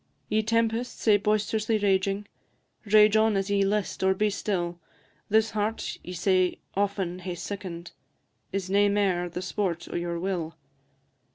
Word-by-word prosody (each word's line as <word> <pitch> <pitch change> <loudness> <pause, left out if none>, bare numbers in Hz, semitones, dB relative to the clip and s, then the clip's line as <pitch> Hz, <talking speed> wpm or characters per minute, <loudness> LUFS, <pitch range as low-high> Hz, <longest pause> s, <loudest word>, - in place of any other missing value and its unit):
Ye 215 +1 +2
tempests, 230 +2 0
sae 210 -2 +5
boist'rously 215 +1 +1
raging, 195 0 +1 0.6
Rage 210 0 +6
on 220 -1 +4
as 195 +1 -1
ye 200 -1 +3
list 205 +1 -1
or 190 0 +3
be 210 +2 +1
still; 175 -4 -2 0.5
This 220 +1 +3
heart 215 +1 -2
ye 180 - -7
sae 185 0 +2 0.2
often 195 -3 -1
hae 180 -1 -5
sicken'd, 175 -1 -6 0.6
Is 195 -1 -2
nae 200 +2 +4
mair 190 -4 +1
the 180 +2 -5
sport 185 -3 -2
o' - - -4
your 170 0 -2
will. 170 -3 -3
200 Hz, 150 wpm, -27 LUFS, 180-210 Hz, 0.6 s, Rage